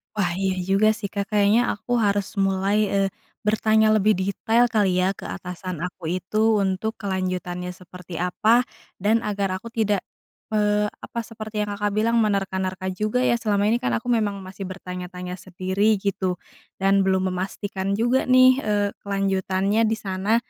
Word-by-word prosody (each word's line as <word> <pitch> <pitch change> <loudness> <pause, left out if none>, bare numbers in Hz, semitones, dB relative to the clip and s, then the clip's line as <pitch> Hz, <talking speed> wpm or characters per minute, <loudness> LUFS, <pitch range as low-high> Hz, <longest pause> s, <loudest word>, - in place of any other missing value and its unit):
Wah 180 -5 0
iya 190 0 -1
juga 195 +4 +3
sih, 210 -1 -4
Kak, 200 0 -4
kayaknya 210 +2 +4
aku 245 +4 -2
harus 205 -3 0
mulai, 195 +1 +1
eee, 195 -1 +2 0.4
bertanya 220 0 +3
lebih 215 0 +4
detail 225 +5 +2
kali 205 -6 +2
ya 190 +2 +1
ke - - -12
atasan 180 -1 -6
aku 180 +1 -6 0.2
itu 215 +4 +2
untuk 195 +3 -1
kelanjutannya 185 -2 -3
seperti 180 -1 -10
apa, 215 +6 +3 0.4
dan 220 +4 +2
agar 200 -2 -1
aku 230 +5 -8
tidak, 210 -4 0 0.5
eee, 210 -1 +2
apa 235 - -7
seperti 215 -1 -4
yang 205 - -4
Kakak 205 -1 -1
bilang 230 +2 +2
menerka-nerka 190 -3 -1
juga 215 +6 0
ya 235 -2 +2
selama 205 -3 +1
ini 235 - +2
kan 255 +1 0
aku 245 +1 -2
memang 215 -4 +1
masih 190 +1 -7
bertanya-tanya 180 -1 -7
sendiri 190 +4 0
gitu, 190 -2 -1 0.4
dan 195 0 +2
belum 190 0 +1
memastikan 195 +1 -3
juga 240 +5 +1
nih, 255 0 +6
eee, 205 -4 0
kelanjutannya 195 +2 0
di 220 - +1
sana, 200 +1 -1
200 Hz, 160 wpm, -23 LUFS, 185-215 Hz, 0.5 s, nih